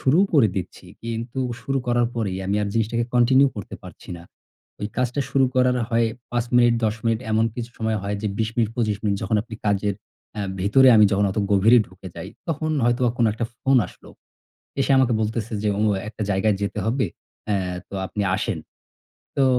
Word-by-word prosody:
শুরুও 155 Hz, +9 st, +4 dB
করে 125 Hz, -8 st, +6 dB
দিচ্ছি, 95 Hz, -, -5 dB, 0.2 s
কিন্তু 115 Hz, +2 st, -4 dB, 0.2 s
শুরু 135 Hz, 0 st, -1 dB
করার 120 Hz, -1 st, +2 dB
পরেই 100 Hz, -5 st, -2 dB
আমি 100 Hz, +2 st, 0 dB
আর 105 Hz, -, -1 dB
জিনিসটাকে 115 Hz, +1 st, 0 dB
কন্টিনিউ 130 Hz, +3 st, +5 dB
করতে 105 Hz, -, -7 dB
পারছি -, -, -13 dB
না। 85 Hz, -, -11 dB, 0.6 s
ঐ -, -, -7 dB
কাজটা 125 Hz, +2 st, 0 dB
শুরু 135 Hz, -1 st, +3 dB
করার 125 Hz, 0 st, +3 dB
হয় 115 Hz, 0 st, +3 dB, 0.2 s
৫ 120 Hz, -1 st, 0 dB
মিনিট, 120 Hz, -1 st, +5 dB
১০ 110 Hz, -1 st, +1 dB
মিনিট 115 Hz, -1 st, +2 dB
এমন 110 Hz, +1 st, +3 dB
কিছু 120 Hz, 0 st, -5 dB
সময় 110 Hz, -1 st, 0 dB
হয় 100 Hz, +1 st, -2 dB
যে, -, -, -1 dB
২০ 110 Hz, -1 st, +1 dB
মিনিট, 115 Hz, -3 st, +2 dB
২৫ 110 Hz, -4 st, 0 dB
মিনিট 100 Hz, -2 st, +1 dB
যখন 110 Hz, -, +1 dB
আপনি 115 Hz, -, -9 dB
কাজের 100 Hz, 0 st, +1 dB, 0.4 s
অ্যা 105 Hz, -, -3 dB, 0.2 s
ভেতরে 130 Hz, +8 st, +5 dB
আমি 105 Hz, -, +7 dB
যখন 100 Hz, +1 st, +2 dB
অত 95 Hz, -, -3 dB
গভীরে 105 Hz, +5 st, +6 dB
ঢুকে 95 Hz, +1 st, -11 dB
যাই, 85 Hz, -, -6 dB, 0.2 s
তখন 155 Hz, 0 st, -1 dB
হয়তোবা 120 Hz, 0 st, +2 dB
কোনো 115 Hz, -, +4 dB
একটা 115 Hz, +2 st, -3 dB
ফোন 135 Hz, 0 st, +3 dB
আসলো। -, -, -16 dB, 0.7 s
এসে 135 Hz, -, 0 dB
আমাকে 130 Hz, -2 st, +3 dB
বলতেসে 110 Hz, +1 st, -2 dB
যে, 105 Hz, -, +1 dB
"ও -, -, 0 dB, 0.3 s
একটা 110 Hz, 0 st, -6 dB
জায়গায় 100 Hz, +1 st, +2 dB
যেতে 100 Hz, -, -2 dB
হবে, 125 Hz, +3 st, +1 dB, 0.4 s
অ্যা 105 Hz, -2 st, +2 dB, 0.3 s
তো -, -, -10 dB
আপনি 105 Hz, +2 st, -3 dB
আসেন।" -, -, -2 dB, 0.8 s
তো 135 Hz, -, +4 dB
115 Hz, 195 wpm, -23 LUFS, 105-125 Hz, 0.8 s, আমি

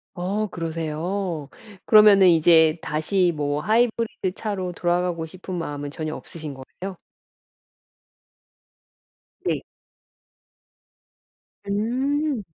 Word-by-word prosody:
어 195 Hz, +4 st, -1 dB
그러세요. 165 Hz, 0 st, -3 dB, 0.4 s
그러면은 210 Hz, -3 st, +7 dB
이제 160 Hz, -1 st, +5 dB
다시 175 Hz, +4 st, +1 dB
뭐 145 Hz, 0 st, -1 dB
하이브리드 225 Hz, -3 st, 0 dB
차로 195 Hz, -4 st, -3 dB
돌아가고 175 Hz, -1 st, 0 dB
싶은 185 Hz, +3 st, -9 dB
마음은 145 Hz, -4 st, -4 dB
전혀 155 Hz, +1 st, -4 dB
없으신 155 Hz, -3 st, -8 dB
거예요? 180 Hz, +8 st, -8 dB, 2.5 s
네. -, -, 0 dB, 2.1 s
음. 255 Hz, +6 st, 0 dB
180 Hz, 190 characters per minute, -23 LUFS, 160-205 Hz, 2.5 s, 그러면은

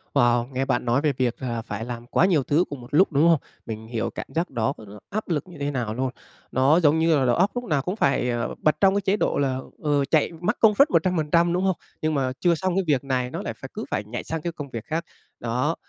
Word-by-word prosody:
Wow, 120 Hz, -2 st, +3 dB
nghe 135 Hz, +1 st, -1 dB
bạn 125 Hz, -2 st, 0 dB
nói 120 Hz, +4 st, +2 dB
về 150 Hz, -2 st, +1 dB
việc 125 Hz, -2 st, +1 dB
là 120 Hz, -3 st, -2 dB
phải 110 Hz, -1 st, -5 dB
làm 120 Hz, -1 st, -7 dB
quá 165 Hz, -, +3 dB
nhiều 170 Hz, -7 st, +3 dB
thứ 150 Hz, +6 st, +2 dB
cùng 140 Hz, -3 st, -7 dB
một 120 Hz, -, -11 dB
lúc, 180 Hz, +6 st, +5 dB
đúng 150 Hz, +3 st, +4 dB
không? 165 Hz, -3 st, +5 dB, 0.3 s
Mình 110 Hz, -1 st, -6 dB
hiểu 115 Hz, 0 st, -2 dB
cảm -, -, -7 dB
giác 170 Hz, +2 st, 0 dB
đó 115 Hz, -4 st, -1 dB
đó 105 Hz, +1 st, -11 dB
áp 215 Hz, 0 st, -4 dB
lực 160 Hz, 0 st, -1 dB
như 175 Hz, -3 st, -12 dB
thế 145 Hz, 0 st, -1 dB
nào 120 Hz, -6 st, -2 dB
luôn! 130 Hz, +3 st, -1 dB, 0.4 s
Nó 135 Hz, +6 st, +4 dB
giống 160 Hz, -1 st, +4 dB
như 160 Hz, -1 st, +4 dB
là 130 Hz, -, +2 dB
đầu 120 Hz, -, +3 dB
óc 190 Hz, +4 st, +2 dB
lúc 245 Hz, -, -2 dB
nào 150 Hz, -, 0 dB
cũng 180 Hz, +7 st, -3 dB
phải, 135 Hz, -, +1 dB
ờ, 120 Hz, -1 st, -2 dB
bật 155 Hz, -, +3 dB
trong 195 Hz, -1 st, +5 dB
cái 200 Hz, -, +1 dB
chế 195 Hz, +2 st, +1 dB
độ -, -, 0 dB
là, 130 Hz, -2 st, 0 dB, 0.2 s
ờ, 145 Hz, -2 st, +2 dB
chạy 150 Hz, +3 st, +2 dB
max 210 Hz, +6 st, 0 dB
công 215 Hz, -2 st, +5 dB
suất 280 Hz, +7 st, +5 dB
100%, 170 Hz, -1 st, +2 dB
đúng 180 Hz, -, 0 dB
không? 190 Hz, -2 st, +2 dB, 0.3 s
Nhưng 155 Hz, 0 st, 0 dB
mà 135 Hz, -3 st, 0 dB
chưa 175 Hz, -2 st, +3 dB
xong 185 Hz, +2 st, -1 dB
cái 195 Hz, -, +2 dB
việc 140 Hz, -5 st, +2 dB
này 130 Hz, -2 st, -1 dB
nó -, -, -4 dB
lại -, -, -4 dB
phải -, -, -9 dB
cứ -, -, -5 dB
phải -, -, -1 dB
nhảy 110 Hz, +3 st, -6 dB
sang 160 Hz, -1 st, -4 dB
cái 170 Hz, +2 st, -3 dB
công 145 Hz, -4 st, -7 dB
việc 115 Hz, -3 st, -6 dB
khác, 165 Hz, +2 st, -2 dB, 0.3 s
đó. 125 Hz, +7 st, -1 dB
145 Hz, 275 wpm, -24 LUFS, 125-170 Hz, 0.4 s, lúc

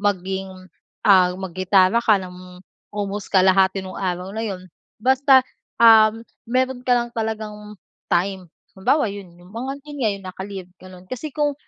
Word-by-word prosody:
maging, 190 Hz, -1 st, -2 dB, 0.6 s
ah, 190 Hz, -3 st, +6 dB
maggitara 185 Hz, +3 st, +2 dB
ka 220 Hz, -3 st, +4 dB
ng 180 Hz, -1 st, -9 dB, 0.4 s
almost 205 Hz, -1 st, -4 dB
kalahati 190 Hz, 0 st, +3 dB
nung 185 Hz, -, -8 dB
araw 185 Hz, 0 st, -3 dB
na 220 Hz, -, -4 dB
yun. 185 Hz, -2 st, -6 dB, 0.3 s
Basta, 265 Hz, +2 st, +4 dB, 0.3 s
um, 225 Hz, 0 st, +6 dB, 0.2 s
meron 255 Hz, +1 st, 0 dB
ka 250 Hz, -1 st, +3 dB
lang 240 Hz, 0 st, -2 dB
talagang 215 Hz, -2 st, -5 dB, 0.3 s
time. 185 Hz, 0 st, -1 dB, 0.3 s
Halimbawa 235 Hz, +4 st, +1 dB
yun 195 Hz, -4 st, -10 dB
yung 175 Hz, +1 st, -18 dB
mga 250 Hz, +4 st, -4 dB
yun 295 Hz, -1 st, -9 dB
nga 200 Hz, -5 st, -2 dB
naka-leave, 190 Hz, -1 st, -8 dB
gano'n. 185 Hz, -1 st, -13 dB
Kasi 255 Hz, +4 st, -5 dB
kung, 295 Hz, -1 st, 0 dB
200 Hz, 145 wpm, -21 LUFS, 185-230 Hz, 0.6 s, ah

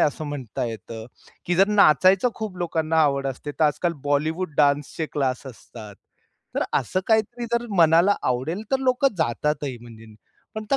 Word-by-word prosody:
असं 150 Hz, +1 st, 0 dB
म्हणता 135 Hz, -6 st, -5 dB
येतं, 115 Hz, -1 st, -7 dB, 0.4 s
की 175 Hz, -, +1 dB
जर 195 Hz, +3 st, +4 dB
नाचायचं 195 Hz, -, +4 dB
खूप 210 Hz, -4 st, -6 dB
लोकांना 160 Hz, -2 st, -1 dB
आवड 140 Hz, -2 st, +1 dB
असते, 135 Hz, +2 st, -5 dB
तर 155 Hz, -, 0 dB
आजकाल 170 Hz, +3 st, +1 dB
बॉलिवूड 155 Hz, +4 st, -1 dB
डान्सचे 145 Hz, +2 st, +1 dB
क्लास 135 Hz, -2 st, -2 dB
असतात. 110 Hz, -4 st, -11 dB, 0.6 s
तर -, -, 0 dB, 0.2 s
असं 185 Hz, -, -2 dB
काहीतरी 225 Hz, +2 st, +1 dB
जर 235 Hz, 0 st, 0 dB
मनाला 170 Hz, +4 st, +5 dB
आवडेल 135 Hz, -, -2 dB
तर 270 Hz, -, +2 dB
लोकं 255 Hz, -1 st, +1 dB
जातातही 145 Hz, -1 st, -1 dB
म्हणजे. 115 Hz, -1 st, -13 dB, 0.5 s
पण 220 Hz, -, -4 dB
आता 270 Hz, +6 st, 0 dB
155 Hz, 155 wpm, -23 LUFS, 135-195 Hz, 0.6 s, मनाला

